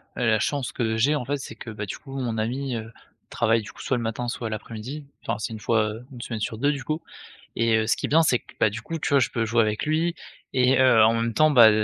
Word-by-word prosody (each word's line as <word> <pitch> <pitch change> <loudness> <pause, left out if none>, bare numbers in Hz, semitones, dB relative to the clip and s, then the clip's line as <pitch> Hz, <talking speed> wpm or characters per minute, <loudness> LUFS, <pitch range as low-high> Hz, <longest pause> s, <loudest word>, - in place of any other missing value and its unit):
la 115 -3 +2
chance 140 +3 -1
que 110 -2 -1
j'ai 135 +7 +3
en 145 - -1
fait 140 +3 -2
c'est 130 - -8
que, 115 - -9
bah, 105 -1 -5
du 95 - -6
coup 135 -1 -9
mon 115 -4 -2
ami, 125 +4 -2
heu, 115 0 -6 0.4
travaille 115 -1 +2
du 105 - -10
coup - - -18
soit 130 - 0
le - - -3
matin, 115 +2 -3
soit 115 -1 -3
l'après-midi. 115 +7 -6 0.2
Enfin - - -2
c'est 110 - -4
une 110 - -6
fois, 110 0 +1
heu, 115 +3 -10
1 125 -3 -9
semaine 115 -2 -4
sur 110 +1 -3
2 145 +5 +2
du 140 -3 -4
coup. 155 +4 -2 0.6
Et, 115 -1 +3
heu, 110 0 0
ce - - +3
qui - - -2
est - - -9
bien 165 +3 +5
c'est 125 -6 +3
que, - - -18
bah, - - +4
du 110 +1 -6
coup 165 +7 -5
tu - - -2
vois? 140 - +5
Je 120 - +2
peux 115 -1 -1
jouer 115 +1 +3
avec 105 -1 0
lui, 165 +3 +1 0.4
et 130 +1 +4
heu, 125 -4 +6
en 110 - +5
même 115 0 -1
temps, 155 0 +5
bah, 120 -5 +9
120 Hz, 290 wpm, -25 LUFS, 110-135 Hz, 0.6 s, bah